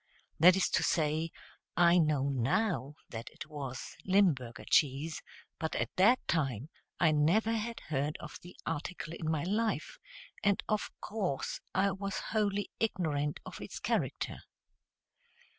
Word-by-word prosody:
That 180 +3 +8
is 190 - +3
to - - +3
say, 160 0 +1 0.5
I 175 0 +6
know 150 -4 +2
now 140 - 0 0.2
that 115 0 -6
it - - -9
was 140 -5 -6
Limburger 170 - +2
cheese, 150 +2 +2 0.4
but 160 - -2
at - - -2
that 215 +7 +6
time 135 -4 0 0.3
I 165 -3 +5
never 170 +10 +3
had 230 +1 -3
heard 145 0 -2
of - - -8
the 175 - -12
article 165 +1 -4
in 160 -2 -3
my 155 -2 0
life, 215 +5 -1 0.4
and 200 -1 +2
of 215 -1 0
course 195 -11 -2 0.2
was 195 0 0
wholly 205 -2 0
ignorant 155 -9 0
of - - -8
its - - -6
character. - - -1
165 Hz, 135 wpm, -32 LUFS, 145-200 Hz, 0.5 s, That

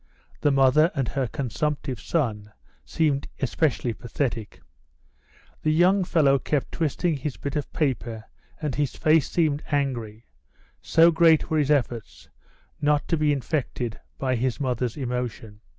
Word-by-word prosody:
The 145 - +2
mother 135 +3 +4
and 135 -4 0
her 135 -2 -1
consumptive 140 +3 -3
son 110 -10 -2 0.3
seemed 145 -4 0
especially 135 -3 0
pathetic. 115 -1 -4 1.0
The 155 - 0
young 185 +5 +4
fellow 145 -6 +3
kept 145 -1 -2
twisting 165 0 0
his 140 0 -4
bit 140 +1 -5
of 150 - -3
paper 120 -8 -2 0.4
and 150 -4 -2
his 145 0 -1
face 155 -1 +3
seemed 155 -4 +1
angry, 120 -6 -2 0.6
so 165 +1 +5
great 165 0 +4
were 155 - +2
his 145 -1 +1
efforts 120 -6 -1 0.5
not 150 0 +2
to 165 - +3
be 155 -1 +2
infected 135 -4 -2 0.2
by 130 -1 0
his 125 +1 -1
mother's 125 -3 -2
emotion. 120 -5 -4
140 Hz, 135 wpm, -25 LUFS, 125-155 Hz, 1.0 s, so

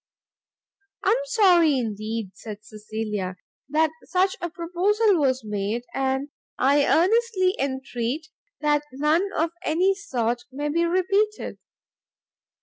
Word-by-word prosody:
"I - - +3
am 460 - +4
sorry, 360 - +4
indeed," 220 -3 -3
said 210 -2 -9
Cecilia, 210 -3 -4 0.3
"that 310 +2 +2
such 375 +1 +1
a 345 - -2
proposal 365 +4 +1
was 260 -3 +1
made, 210 +3 -2
and 270 +1 -1 0.3
I 280 +2 +3
earnestly 380 +1 +3
entreat 265 +2 -3 0.3
that 295 -1 +3
none 305 +8 +2
of 325 +1 +1
any 365 +5 +2
sort 245 - -2
may 290 +3 -3
be 335 +3 +1
repeated." 395 +5 0
300 Hz, 115 wpm, -24 LUFS, 240-370 Hz, 0.3 s, am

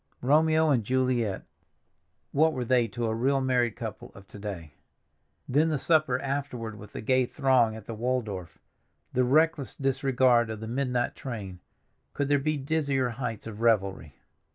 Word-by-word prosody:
Romeo 155 +3 +4
and 120 -5 +2
Juliet—what 130 +5 -2
were 125 -3 -3
they 120 -1 +3
to 120 +2 -4
a 110 - 0
real 135 +5 +1
married 125 -3 +1
couple - - -7
of 100 0 -14
to 105 - -11
day? 90 -8 -7 0.7
Then 150 +5 +2
the 155 - 0
supper 155 -3 +2
afterward 135 -5 -4
with 105 - -12
the - - -5
gay 130 +2 +2
throng 130 -6 +2
at 110 -2 -10
the 115 - -6
Waldorf—the 110 0 -4
reckless 150 +1 +2
disregard 130 -3 +2
of 110 -1 -5
the 110 - -6
midnight 125 0 -1
train—could 115 +4 -7
there 145 0 +4
be 155 +2 -1
dizzier 140 -3 0
heights 115 -2 -5
of 110 -1 -8
revelry? 95 - +1
125 Hz, 150 wpm, -27 LUFS, 110-140 Hz, 0.7 s, Romeo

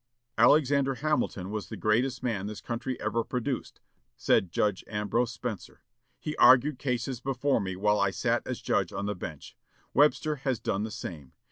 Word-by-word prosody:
"Alexander 135 +2 +4
Hamilton 135 -10 -1
was 105 -2 -4
the - - -6
greatest 120 +4 +1
man 105 -5 -1
this 105 0 -6
country 120 +2 -4
ever 115 +2 -1
produced," 125 +2 -4 0.4
said 90 - +2
Judge 105 +1 0
Ambrose 110 +3 0
Spencer.... 115 -4 -6 0.4
"He 150 -1 -4
argued 130 +2 +6
cases 125 -1 -2
before 135 +2 0
me 95 -1 -3
while 105 +2 +2
I 100 - +3
sat - - 0
as - - -4
judge - - +1
on 100 - -4
the 105 - -1
bench. 85 -6 -8 0.4
Webster 150 +1 +3
has 130 -3 -1
done 100 - -1
the 110 - -3
same. 75 -10 -8
115 Hz, 165 wpm, -28 LUFS, 105-135 Hz, 0.4 s, argued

